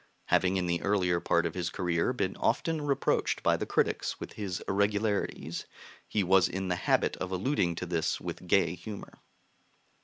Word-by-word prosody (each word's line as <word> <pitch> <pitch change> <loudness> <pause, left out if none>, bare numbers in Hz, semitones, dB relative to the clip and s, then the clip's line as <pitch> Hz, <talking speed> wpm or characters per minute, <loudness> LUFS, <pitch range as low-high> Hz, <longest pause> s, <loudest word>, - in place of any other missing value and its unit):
Having 95 +1 +3
in 90 - 0
the 85 -1 0
earlier 90 -4 +2
part 85 0 +2
of - - -2
his 90 -2 -2
career 90 +4 0
been 100 -7 -1
often 155 +6 0
reproached 140 -2 0
by - - +4
the - - -3
critics - - 0
with - - -7
his 95 -4 -4
irregularities, 100 -5 0 0.4
he 105 - +1
was 95 0 +4
in 95 0 -3
the 90 - +1
habit - - +1
of 95 0 -4
alluding 95 - +1
to 90 - -4
this 85 -2 -1
with 90 - -6
gay 85 -2 +3
humor." 100 +2 -9
95 Hz, 175 wpm, -30 LUFS, 90-100 Hz, 0.4 s, by